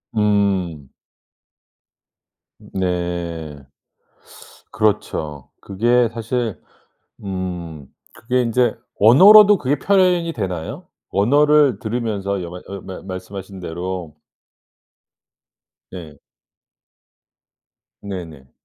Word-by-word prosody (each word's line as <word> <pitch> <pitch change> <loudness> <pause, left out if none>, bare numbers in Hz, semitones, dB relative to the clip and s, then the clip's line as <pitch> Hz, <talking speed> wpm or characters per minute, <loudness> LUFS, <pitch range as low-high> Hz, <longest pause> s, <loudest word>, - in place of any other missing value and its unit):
음. 100 -8 0 1.7
네. 85 -5 -4 1.1
그렇죠. 80 - -2
그게 120 +4 +1
사실 115 -1 -3 0.6
음 90 -6 -5 0.3
그게 125 +2 -1
인제 120 0 +1 0.2
언어로도 200 - +8
그게 145 -2 -1
표현이 180 -4 +2
되나요? 90 - -5 0.2
언어를 145 +6 +3
들으면서 105 -5 -3
여 85 - -7
말 90 +1 -9
어 100 -1 -7
말 95 - -9
말씀하신 95 +1 -8
대로. 90 -2 -6 1.8
예. 80 -5 -9 1.9
네네. 80 -9 -8
100 Hz, 150 characters per minute, -20 LUFS, 90-120 Hz, 1.9 s, 언어로도